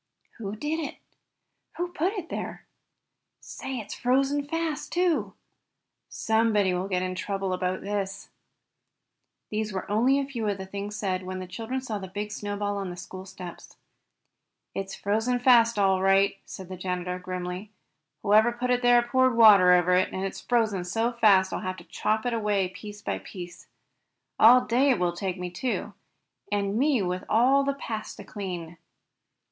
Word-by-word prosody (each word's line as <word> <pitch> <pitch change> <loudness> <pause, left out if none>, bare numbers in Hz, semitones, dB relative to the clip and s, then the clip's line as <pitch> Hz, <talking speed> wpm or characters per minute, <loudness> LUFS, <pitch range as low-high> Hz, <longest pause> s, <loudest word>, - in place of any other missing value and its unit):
"Who 205 -2 -4
did 300 +8 -2
it?" 305 - -5 0.8
"Who 350 0 -2
put 350 +3 -1
it 370 -6 -6
there?" - - -5 0.7
"Say, 265 -1 -6
it's 215 -3 -6
frozen 275 +3 +1
fast, 325 -1 -3
too!" 350 -2 +1 0.7
"Somebody 220 -4 +2
will 180 +2 -2
get 185 -2 0
into 185 0 -3
trouble 195 -2 -2
about 185 0 -2
this." 200 -1 -4 1.2
These 215 0 -2
were 190 -1 -4
only 245 +6 +3
a 280 - 0
few 240 -6 -4
of 200 -1 0
the 190 - -6
things 200 +2 -6
said 190 -3 -1
when 185 0 -5
the 185 - -5
children 225 +8 -4
saw 220 -5 -4
the 190 - -7
big 205 +3 -5
snowball 205 -1 -3
on 195 -2 -3
the 175 - -7
school 185 +2 -9
steps. 180 -2 -10 1.0
"It's 195 0 -4
frozen 220 +5 0
fast 235 -2 +5
all 190 -2 +3
right 195 +1 +4
enough," 195 - -23
said 185 -1 -9
the 185 - -6
janitor, 180 0 -3
grimly. 180 +2 -5 0.5
"Whoever 215 +3 +5
put 250 +1 -2
it 245 0 +2
there 245 -1 +5
poured 260 0 +2
water 200 -5 +8
over 180 0 +4
it, 185 +1 +3
and 190 +1 -3
it's 195 - -5
frozen 220 -6 +1
so 225 +6 0
fast 200 -5 +4
that - - -2
I'll - - -6
have 185 0 -4
to - - -11
chop 220 +1 -1
it 245 - 0
away 205 -4 +1
piece 205 +2 -10
by 95 - -2
piece. 175 - -10 0.7
All 245 +3 +8
day 250 +5 +3
it 255 - +4
will 175 -1 0
take 185 +1 -3
me, 180 -1 -5
too, 245 +8 -3 0.6
and 200 +1 0
me 275 -6 +3
with 180 +1 -2
all 260 +5 +4
the 280 0 -1
paths 220 -6 -5
to - - -10
clean!" 175 -5 -6
205 Hz, 175 wpm, -27 LUFS, 185-240 Hz, 1.2 s, water